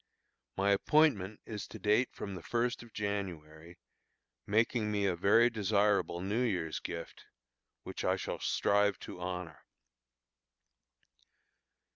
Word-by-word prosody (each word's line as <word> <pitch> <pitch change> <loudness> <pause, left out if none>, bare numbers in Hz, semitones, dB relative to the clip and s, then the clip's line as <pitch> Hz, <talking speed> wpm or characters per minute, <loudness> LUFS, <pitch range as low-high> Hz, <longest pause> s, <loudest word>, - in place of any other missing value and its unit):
My 100 +1 +3
appointment 105 -4 +3
is 105 -2 -6
to - - -9
date 105 +4 +2
from 100 - -6
the 90 - -7
first 120 +5 -1
of 120 -1 -13
January, 85 -6 -5 0.7
making 110 +1 +1
me 100 -1 0
a 95 -3 +1
very 105 +7 +5
desirable 105 -5 +1
New 100 +6 -1
Year's 90 -10 -1
gift, 85 -1 -7 0.6
which - - -6
I - - +2
shall - - -4
strive 100 -1 +2
to 90 - -8
honor. 90 -3 -5
100 Hz, 120 wpm, -32 LUFS, 90-110 Hz, 0.7 s, very